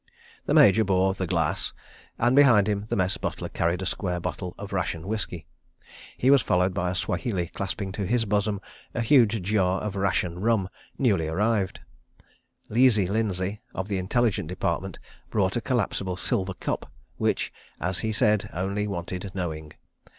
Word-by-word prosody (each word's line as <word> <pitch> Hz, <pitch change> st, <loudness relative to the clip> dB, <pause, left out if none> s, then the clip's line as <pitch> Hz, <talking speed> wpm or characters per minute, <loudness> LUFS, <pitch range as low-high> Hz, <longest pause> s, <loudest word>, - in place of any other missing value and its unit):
The -, -, +2 dB
Major 110 Hz, -8 st, +7 dB
bore 95 Hz, -1 st, +2 dB
The 95 Hz, -1 st, -3 dB
Glass, 80 Hz, -3 st, 0 dB, 0.4 s
and, 125 Hz, -, +3 dB
behind 125 Hz, -8 st, +6 dB
him, 105 Hz, -1 st, -1 dB
the -, -, -1 dB
Mess 95 Hz, 0 st, +2 dB
butler -, -, -4 dB
carried 85 Hz, +3 st, 0 dB
a -, -, -3 dB
square 90 Hz, 0 st, -2 dB
bottle 90 Hz, +1 st, -4 dB
of 100 Hz, 0 st, -7 dB
ration 85 Hz, -2 st, -2 dB
whisky. 100 Hz, -6 st, -3 dB, 0.7 s
He 130 Hz, -, +4 dB
was 140 Hz, -2 st, +6 dB
followed 90 Hz, +1 st, +2 dB
by 90 Hz, -2 st, -1 dB
a 90 Hz, -, -2 dB
Swahili 90 Hz, +1 st, -1 dB
clasping 100 Hz, -3 st, -4 dB
to 100 Hz, 0 st, -3 dB
his 115 Hz, +2 st, +1 dB
bosom 105 Hz, -1 st, 0 dB, 0.3 s
a 120 Hz, -, 0 dB
huge 115 Hz, -4 st, +4 dB
jar 95 Hz, -1 st, +1 dB
of 105 Hz, -2 st, -4 dB
ration 95 Hz, -3 st, 0 dB
rum, 105 Hz, -2 st, +1 dB, 0.3 s
newly 100 Hz, -, +2 dB
arrived. 100 Hz, +3 st, 0 dB, 0.9 s
"Leesey" 115 Hz, -3 st, +4 dB
Lindsay, 100 Hz, -1 st, -1 dB
of 95 Hz, +2 st, -3 dB
the 100 Hz, -2 st, 0 dB
Intelligence 100 Hz, -1 st, +1 dB
Department, 90 Hz, 0 st, -2 dB, 0.3 s
brought 95 Hz, -3 st, +1 dB
a 120 Hz, -, 0 dB
collapsible 100 Hz, -6 st, -1 dB
silver 95 Hz, +1 st, 0 dB
cup, -, -, -4 dB, 0.3 s
which, -, -, 0 dB, 0.3 s
as 90 Hz, +2 st, -1 dB
he 110 Hz, -, -1 dB
said, 105 Hz, -1 st, +2 dB
only 100 Hz, +3 st, -1 dB
wanted 90 Hz, 0 st, -4 dB
knowing. 80 Hz, -4 st, -4 dB
95 Hz, 160 wpm, -26 LUFS, 90-110 Hz, 0.9 s, Major